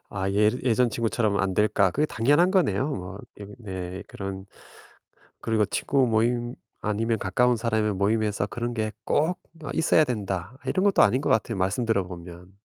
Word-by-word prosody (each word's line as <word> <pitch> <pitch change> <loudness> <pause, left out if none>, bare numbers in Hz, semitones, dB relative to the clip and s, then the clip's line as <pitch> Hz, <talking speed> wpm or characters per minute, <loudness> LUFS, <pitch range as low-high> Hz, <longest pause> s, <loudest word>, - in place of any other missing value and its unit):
'아 95 -1 -2
예 105 +1 +4
예전 125 0 +2
친구처럼 110 -3 0
안 95 -1 -1
될까?' 100 -2 +3
그게 150 - 0
당연한 145 +11 +3
거네요. 145 - +1
뭐 95 -3 -6 0.2
이거 100 0 -9
네 95 -3 -6
그런 95 -1 -6 1.0
그리고 110 -2 +1
'친구 135 +6 +1
모임 120 +2 0 0.3
아니면 110 +2 0
가까운 125 +6 +2
사람의 110 -3 0
모임에서 105 0 0
그런 120 +1 -4
게 110 -2 -2
꼭 160 +5 +1 0.3
어 140 - -6
있어야 160 -1 +4
된다.' 100 - -4
이런 185 - 0
것도 200 -1 +4
아닌 130 - +4
것 - - -1
같아요 110 -1 +1
말씀 95 +6 0
들어보면. 90 -4 -4
110 Hz, 335 characters per minute, -25 LUFS, 100-120 Hz, 1.0 s, 예